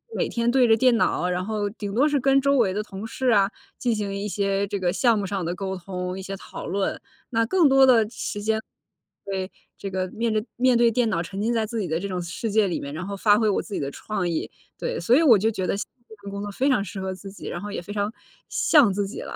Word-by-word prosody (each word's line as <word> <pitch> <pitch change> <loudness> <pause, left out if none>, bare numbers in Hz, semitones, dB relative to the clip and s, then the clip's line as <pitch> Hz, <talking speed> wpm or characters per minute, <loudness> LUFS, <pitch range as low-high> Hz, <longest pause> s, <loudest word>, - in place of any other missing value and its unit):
每 - - 0
天 235 0 0
对 255 -2 +4
着 225 0 +5
电 250 0 +4
脑， 180 - +1
然 180 +1 -1
后 210 0 -2
顶 205 -2 -6
多 280 +5 +4
是 290 -2 +1
跟 270 +1 +4
周 280 0 +2
围 195 -5 +3
的 210 - -1
同 205 +1 -7
事 260 +2 -1
啊， 200 -3 +4 0.3
进 240 -3 +1
行 200 -2 -3
一 200 +1 -3
些 195 +1 0
这 200 -1 -3
个 180 -1 0
项 235 0 +3
目 200 - -1
上 195 -2 -3
的 175 +2 -2
沟 190 0 -3
通、 180 0 -5
一 - - -5
些 195 +1 -6
讨 - - -8
论。 195 +2 -1 0.3
那 230 0 +2
更 345 0 +4
多 270 0 +5
的 230 -5 +6
时 215 -2 -5
间 220 +1 0 0.6
对， 190 -1 -3 0.3
这 195 - -4
个 185 -1 -2
面 230 0 -1
着 215 0 0
面 250 -1 +4
对 235 -1 +4
电 230 -1 +1
脑 170 -4 0
沉 195 +4 -6
浸 230 +3 +1
在 220 -1 +1
自 225 +1 -4
己 185 - -2
的 160 +1 -1
这 200 - -4
种 180 -2 -3
世 175 +6 -4
界 215 -2 +3
里 175 - -2
面， 140 +1 -6
然 180 +5 -5
后 200 -1 -4
发 210 +1 +4
挥 220 -2 +2
我 - - +1
自 205 - -10
己 - - -1
的 140 - -2
创 195 -5 -3
意， 165 - -3 0.3
对。 - - -3
所 240 - +3
以 325 - +4
我 235 -9 +7
就 220 +3 +2
觉 190 -4 -2
得 - - 0
现 200 - -3
在 240 - -38
这 220 - -12
份 200 - -7
工 200 0 -5
作 205 - -5
非 265 +7 +1
常 250 -7 +2
适 195 - -6
合 190 0 -3
自 195 +1 -10
己， 205 - -10
然 175 - -4
后 205 +1 -6
也 200 - -4
非 200 - -9
常 205 +1 -1 0.4
像 255 -11 +4
自 200 0 -1
己 210 - -7
了， - - -7
205 Hz, 305 characters per minute, -24 LUFS, 190-230 Hz, 0.6 s, 我